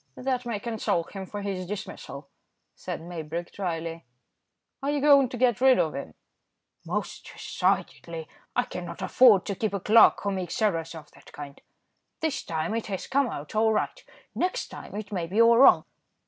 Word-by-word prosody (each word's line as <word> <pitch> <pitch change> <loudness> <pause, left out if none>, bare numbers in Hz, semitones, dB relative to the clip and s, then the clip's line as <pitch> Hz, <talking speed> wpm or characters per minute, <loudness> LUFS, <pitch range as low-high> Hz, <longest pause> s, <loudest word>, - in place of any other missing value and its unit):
"That 255 -1 -2
may 225 -4 -2
console 220 -6 -1
him 190 +2 -8
for 205 +1 -6
his 190 -3 -3
dismissal," 160 -8 -7 0.5
said - - -6
Maybrick, 170 0 -6
dryly. 165 -3 -4 0.8
"Are 275 - -1
you 290 0 +1
going 280 -2 +6
to 245 - -6
get 245 -1 +2
rid 265 -1 +6
of 160 - +1
him?" 110 - -7 0.7
"Most - - -4
decidedly. 165 -2 -2 0.3
I 245 - +3
cannot 180 -5 -7
afford 210 0 +6
to 200 - -2
keep 205 +1 -2
a - - -1
clerk 220 +5 +6
who 200 - 0
makes 185 -3 -3
errors 165 -7 0
of 155 -2 -11
that - - -18
kind. 145 -1 -9 0.6
This 315 -4 -1
time 160 +4 -3
it 230 0 -2
has 195 -3 -4
come 275 -2 +1
out 145 -6 -7
all 220 0 +3
right; - - -2 0.3
next 365 +1 -1
time - - -10
it 215 0 -6
may 175 -4 -2
be 200 +6 -1
all 230 0 +7
wrong." 270 - +7
200 Hz, 175 wpm, -27 LUFS, 170-235 Hz, 0.8 s, all